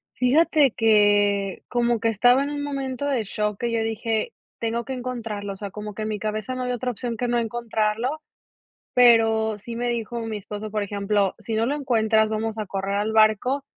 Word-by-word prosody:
Fíjate 290 Hz, +2 st, +4 dB
que 205 Hz, -3 st, +3 dB
como 240 Hz, -1 st, +1 dB
que 230 Hz, -, 0 dB
estaba 245 Hz, +5 st, +4 dB
en 285 Hz, -, -3 dB
un 290 Hz, 0 st, -3 dB
momento 275 Hz, -2 st, -3 dB
de 270 Hz, -5 st, 0 dB
shock 210 Hz, 0 st, -2 dB
que 240 Hz, -1 st, -1 dB
yo 230 Hz, -1 st, 0 dB
dije: 225 Hz, -, -2 dB, 0.3 s
"Tengo 230 Hz, +1 st, -1 dB
que 265 Hz, -, -5 dB
encontrarlo", 230 Hz, -5 st, -4 dB
o -, -, -10 dB
sea, 200 Hz, 0 st, -5 dB
como 210 Hz, +1 st, -7 dB
que 215 Hz, -, -5 dB
en -, -, -2 dB
mi 215 Hz, -, -2 dB
cabeza 215 Hz, +4 st, -3 dB
no 255 Hz, -, -3 dB
había 250 Hz, 0 st, -1 dB
otra 250 Hz, +1 st, -2 dB
opción 235 Hz, +1 st, -4 dB
que 245 Hz, -, -1 dB
no 240 Hz, 0 st, +1 dB
encontrarlo, 230 Hz, +3 st, -1 dB, 0.7 s
pero, 225 Hz, -3 st, +4 dB
sí 230 Hz, +3 st, -8 dB
me 245 Hz, +1 st, -1 dB
dijo 235 Hz, 0 st, -2 dB
mi 225 Hz, -1 st, -4 dB
esposo, 210 Hz, +1 st, -7 dB
por 210 Hz, 0 st, -1 dB
ejemplo, 200 Hz, 0 st, 0 dB
"Si 220 Hz, +1 st, -5 dB
no 225 Hz, +1 st, +2 dB
lo 280 Hz, +4 st, 0 dB
encuentras 220 Hz, -6 st, +2 dB
vamos 220 Hz, 0 st, -2 dB
a 215 Hz, -, -3 dB
correr 195 Hz, 0 st, -3 dB
al 210 Hz, +2 st, -1 dB
barco, 220 Hz, +5 st, +3 dB
225 Hz, 205 wpm, -24 LUFS, 210-245 Hz, 0.7 s, Fíjate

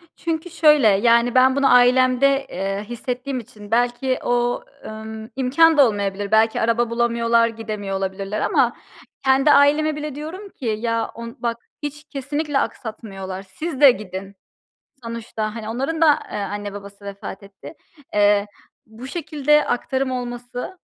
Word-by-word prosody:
Çünkü 330 Hz, +1 st, -3 dB
şöyle, 300 Hz, -7 st, +5 dB
yani, 235 Hz, +4 st, +3 dB
ben 260 Hz, +1 st, +5 dB
bunu 280 Hz, -1 st, +4 dB
ailemde, 255 Hz, +2 st, +4 dB
eee, 195 Hz, +2 st, -3 dB
hissettiğim 250 Hz, +2 st, -4 dB
için 210 Hz, -2 st, -13 dB
belki 245 Hz, +2 st, +1 dB
o, 245 Hz, 0 st, 0 dB, 0.2 s
ımm, 220 Hz, 0 st, -8 dB
imkân 300 Hz, +5 st, +4 dB
da 280 Hz, -3 st, +7 dB
olmayabilir, 200 Hz, -1 st, -3 dB
belki 220 Hz, +1 st, +3 dB
araba 230 Hz, +1 st, +1 dB
bulamıyorlar, 235 Hz, 0 st, +2 dB
gidemiyor 215 Hz, -4 st, -4 dB
olabilirler 195 Hz, +2 st, -3 dB
ama 270 Hz, -, +2 dB, 0.5 s
kendi 270 Hz, +2 st, +4 dB
aileme 295 Hz, +2 st, +4 dB
bile 300 Hz, -2 st, -5 dB
diyorum 340 Hz, +8 st, -7 dB
ki: 270 Hz, -, -11 dB
"Ya 230 Hz, 0 st, -1 dB
on 230 Hz, 0 st, -8 dB
bak 235 Hz, -1 st, -2 dB, 0.3 s
hiç 295 Hz, +1 st, -5 dB
kesinlikle 290 Hz, +1 st, -2 dB
aksatmıyorlar, 195 Hz, -7 st, -5 dB
siz 270 Hz, -, -6 dB
de 280 Hz, -3 st, +10 dB
gidin." 195 Hz, -2 st, -7 dB, 0.7 s
Sonuçta, 225 Hz, -2 st, -4 dB
hani, 220 Hz, -2 st, -6 dB
onların 270 Hz, +8 st, -2 dB
da, 300 Hz, -3 st, +6 dB
eee, -, -, -3 dB
anne 205 Hz, 0 st, -4 dB
babası 200 Hz, 0 st, -11 dB
vefat 200 Hz, -1 st, -8 dB
etti. 200 Hz, +9 st, -12 dB, 0.4 s
Eee, 205 Hz, 0 st, +4 dB, 0.4 s
bu 220 Hz, +3 st, -11 dB
şekilde 300 Hz, -1 st, +1 dB
aktarım 260 Hz, +2 st, -1 dB
olması, 245 Hz, +6 st, -5 dB
240 Hz, 140 wpm, -21 LUFS, 215-275 Hz, 0.7 s, de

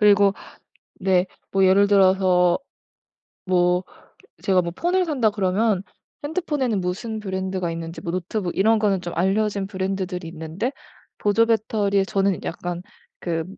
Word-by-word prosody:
그리고 205 Hz, -1 st, +5 dB, 0.6 s
네, 185 Hz, -2 st, +2 dB, 0.3 s
뭐 195 Hz, 0 st, +3 dB
예를 200 Hz, +2 st, +5 dB
들어서 185 Hz, -2 st, +4 dB, 0.9 s
뭐 180 Hz, 0 st, +2 dB, 0.6 s
제가 185 Hz, -2 st, +3 dB
뭐 170 Hz, -, -4 dB
폰을 360 Hz, +2 st, +1 dB
산다 260 Hz, -9 st, +2 dB
그러면 200 Hz, 0 st, +1 dB, 0.4 s
핸드폰에는 290 Hz, -, -1 dB
무슨 215 Hz, +5 st, -3 dB
브랜드가 190 Hz, -3 st, -3 dB
있는지 165 Hz, 0 st, -6 dB
뭐 170 Hz, -, -4 dB
노트북 185 Hz, +1 st, -3 dB
이런 220 Hz, +3 st, +4 dB
거는 200 Hz, -3 st, +1 dB
좀 175 Hz, -1 st, -5 dB
알려진 195 Hz, +2 st, +1 dB
브랜드들이 190 Hz, -2 st, -3 dB
있는데 165 Hz, +8 st, -4 dB, 0.5 s
보조 210 Hz, +2 st, +3 dB
배터리에 210 Hz, -3 st, +1 dB
저는 195 Hz, -1 st, +1 dB
약간 175 Hz, +1 st, -4 dB, 0.4 s
그 165 Hz, -2 st, -2 dB
195 Hz, 290 characters per minute, -23 LUFS, 180-210 Hz, 0.9 s, 그리고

